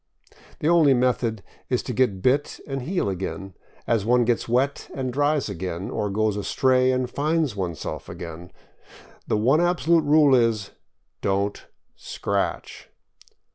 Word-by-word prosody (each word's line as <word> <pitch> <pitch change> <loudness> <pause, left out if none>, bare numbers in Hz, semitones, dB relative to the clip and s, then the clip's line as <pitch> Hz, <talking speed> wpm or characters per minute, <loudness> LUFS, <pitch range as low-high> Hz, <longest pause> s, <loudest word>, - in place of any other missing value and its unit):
The 150 - 0
only 160 -5 +5
method 120 -4 0 0.3
is 125 - 0
to 125 - -4
get 105 -6 0
bit 140 +3 +1
and 135 -1 -4
heal 175 - -1
again, 95 0 -4 0.3
as 115 -4 +1
one 120 +2 +3
gets 120 0 0
wet 130 +4 0
and 130 -2 -3
dries 145 +1 +1
again, 95 -1 -5
or 105 -2 -2
goes 105 +1 0
astray 130 +5 +2
and 130 -1 0
finds 150 -1 0
oneself 90 -5 -5
again. 85 +1 -8 0.8
The - - +1
one 130 +9 +3
absolute 170 -2 +2
rule 145 -1 +5
is. 115 -5 +2 0.5
Don't 100 +1 -1 0.3
scratch! - - -4
125 Hz, 135 wpm, -24 LUFS, 100-140 Hz, 0.8 s, only